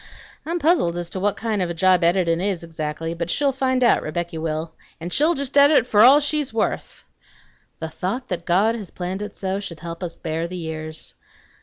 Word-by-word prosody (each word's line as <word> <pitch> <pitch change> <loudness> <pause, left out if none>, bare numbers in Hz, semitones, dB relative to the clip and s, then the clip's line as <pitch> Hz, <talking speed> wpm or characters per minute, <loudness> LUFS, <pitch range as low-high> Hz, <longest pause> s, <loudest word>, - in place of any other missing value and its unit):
I'm 340 +2 -1
puzzled 310 - +2
as 175 -1 -4
to 190 - -3
what 205 +1 +1
kind 220 -3 -1
of 180 - -1
a 170 - -4
job 185 +1 +4
editin' 170 -1 +2
is, 190 -3 -1
exactly; 165 0 -4
but 170 0 -4
she'll 280 +8 +1
find 260 -1 0
out, 235 - +4
Rebecky 170 +1 -4
will. 160 0 -3 0.3
An' 170 +2 -6
she'll 315 - +3
just 280 -1 -4
edit 285 -3 +6
for 210 -4 +3
all 265 +5 +8
she's 295 -1 -1
worth! 225 - -2 0.8
"'The 160 - -4
thought 200 +11 -4
that 180 -2 -3
God 200 +6 +3
has 210 -6 -6
planned 185 +2 -5
it 210 -1 -7
so 190 0 -2
Should 175 -6 -7
help 170 0 -7
us 175 -2 -4
bear 165 0 -3
the 180 +1 -6
years.' 155 -1 -6
185 Hz, 205 wpm, -22 LUFS, 165-235 Hz, 0.8 s, all